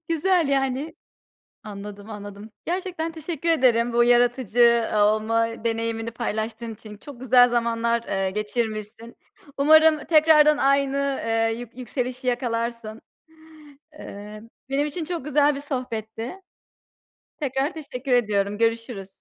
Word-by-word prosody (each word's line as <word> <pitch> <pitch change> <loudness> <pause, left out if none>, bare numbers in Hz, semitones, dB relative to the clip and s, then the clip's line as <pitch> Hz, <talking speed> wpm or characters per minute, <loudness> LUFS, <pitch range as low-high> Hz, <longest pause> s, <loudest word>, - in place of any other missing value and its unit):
Güzel 335 -1 +2
yani. 270 +2 -1 0.7
Anladım, 205 0 -9
anladım. 205 0 -9
Gerçekten 350 -2 -3
teşekkür 325 0 -4
ederim 245 -6 +3
bu 240 0 +4
yaratıcı 240 -1 +3
olma 215 +2 +2 0.2
deneyimini 230 0 -2
paylaştığın 225 0 -4
için. 210 -1 -12
Çok 265 +1 -12
güzel 250 -1 +5
zamanlar, 235 0 0
eee, 195 -3 -2
geçirmişsin. 215 +1 -4 0.4
Umarım 315 +2 +6
tekrardan 305 -2 +5
aynı, 275 0 +2 0.3
eee, 225 0 +1
yük 245 0 -10
yükselişi 255 +1 -4
yakalarsın. 230 -2 -2 1.0
Eee, 210 +1 -9 0.3
benim 280 +2 +1
için 320 +3 -5
çok 335 -4 -5
güzel 295 0 +3
bir - - -5
sohbetti. 230 -5 -5 1.1
Tekrar 270 +1 -1
teşekkür 275 -4 -6
ediyorum. 205 -3 +1
Görüşürüz. 230 -3 -1
240 Hz, 110 wpm, -24 LUFS, 225-280 Hz, 1.1 s, Umarım